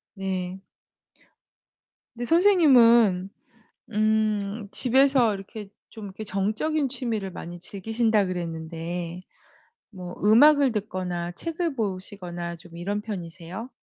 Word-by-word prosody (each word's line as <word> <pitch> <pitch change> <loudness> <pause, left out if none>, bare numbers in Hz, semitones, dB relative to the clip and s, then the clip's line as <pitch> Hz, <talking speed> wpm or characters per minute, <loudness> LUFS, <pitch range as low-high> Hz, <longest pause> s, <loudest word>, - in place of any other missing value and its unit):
네. 190 -1 -4 1.5
근데 240 +1 -4
선생님은 240 - +5 0.6
음 215 -1 0
집에서 260 -3 +3
이렇게 200 +1 -8 0.2
좀 220 -3 -9
이렇게 200 +2 -8
정적인 220 +10 -1
취미를 230 -7 -3
많이 175 0 -8
즐기신다 220 +2 0
그랬는데 170 0 -5 0.7
뭐 180 -3 -8
음악을 275 +6 +6
듣거나 185 -5 -3
책을 330 - -3
보시거나 185 -4 -4
좀 170 0 -14
이런 200 +4 -3
편이세요? 185 +1 -7
205 Hz, 235 characters per minute, -25 LUFS, 180-230 Hz, 1.5 s, 음악을